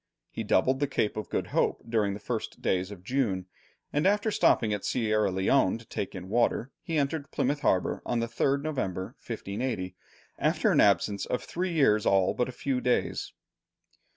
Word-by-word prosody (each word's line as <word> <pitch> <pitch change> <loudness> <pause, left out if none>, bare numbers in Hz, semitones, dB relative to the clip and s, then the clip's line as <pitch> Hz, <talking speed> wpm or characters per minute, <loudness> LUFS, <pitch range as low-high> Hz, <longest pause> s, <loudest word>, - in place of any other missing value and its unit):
He - - -4
doubled 130 +8 +2
the 145 - +1
Cape 110 -6 0
of 110 - -5
Good - - -2
Hope - - +1
during 105 -4 +1
the - - -7
first - - -4
days 95 0 0
of 100 -3 -10
June, 105 -6 0 0.5
and 150 +5 +2
after 205 +2 +2
stopping 110 - +3
at 105 - -3
Sierra 110 -4 +1
Leone 95 +3 +2
to 115 - -14
take 100 - -5
in 90 0 -7
water, 120 +4 +1
he 165 - -2
entered 145 0 -1
Plymouth 145 +1 0
harbour 90 -9 +1
on 120 - -1
the 115 - 0
3rd 135 +4 0
November, 100 - -3
1580, 100 -4 -4 0.4
after - - +2
an - - +5
absence 100 -1 +2
of 125 - -2
three 180 0 -3
years 110 -9 +3
all 95 -1 +3
but 125 - -1
a - - -4
few 130 0 -2
days. 125 - 0
115 Hz, 180 wpm, -28 LUFS, 100-140 Hz, 0.5 s, an